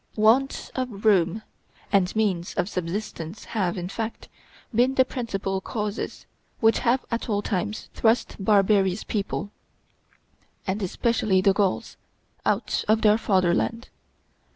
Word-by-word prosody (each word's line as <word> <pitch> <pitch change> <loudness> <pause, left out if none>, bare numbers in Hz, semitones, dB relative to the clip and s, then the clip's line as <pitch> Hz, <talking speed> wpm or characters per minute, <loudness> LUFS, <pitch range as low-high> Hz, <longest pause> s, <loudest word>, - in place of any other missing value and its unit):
Want 230 +6 +2
of 245 -6 -4
room 195 0 +3 0.5
and 195 -2 +2
means 195 -4 0
of 180 -1 0
subsistence 180 -1 -5
have, 190 -6 -1
in 175 0 -3
fact, 225 +3 -5 0.4
been 250 +4 +3
the 260 - +5
principal 195 -7 -3
causes 210 0 -4 0.3
which 225 0 +4
have 250 +1 +1
at 230 +1 -2
all 205 -1 0
times 210 +2 -2
thrust 230 +1 +2
barbarous 195 -1 +3
people, 205 -1 -3 1.1
and 195 +2 -2
especially 215 0 +1
the 195 +1 +4
Gauls, 195 -2 -1 0.5
out - - 0
of 220 +1 +3
their 215 0 +5
fatherland. 190 +4 +1
210 Hz, 125 wpm, -25 LUFS, 190-225 Hz, 1.1 s, the